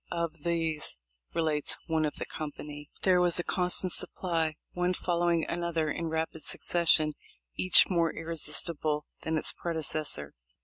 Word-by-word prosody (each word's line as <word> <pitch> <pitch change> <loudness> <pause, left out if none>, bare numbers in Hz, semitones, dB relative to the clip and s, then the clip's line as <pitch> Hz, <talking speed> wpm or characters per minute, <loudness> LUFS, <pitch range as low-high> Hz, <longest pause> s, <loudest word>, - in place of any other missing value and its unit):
"Of 170 -2 -4
these," 165 - -1 0.4
relates 155 -3 -1
one 160 -1 0
of 150 - -3
the - - -5
company,* 150 -1 -8
"there 180 -2 +4
was 175 -1 +3
a 175 - -1
constant 180 0 +4
supply, 165 -4 0 0.2
one 180 +1 -1
following 170 -2 0
another 170 -3 -2
in 165 - -3
rapid 160 0 -3
succession, 160 -3 +2 0.4
each 185 - +6
more 170 -3 +1
irresistible 160 -2 -2 0.2
than 160 0 -1
its - - -1
predecessor. 155 - -1
165 Hz, 135 wpm, -29 LUFS, 155-170 Hz, 0.4 s, each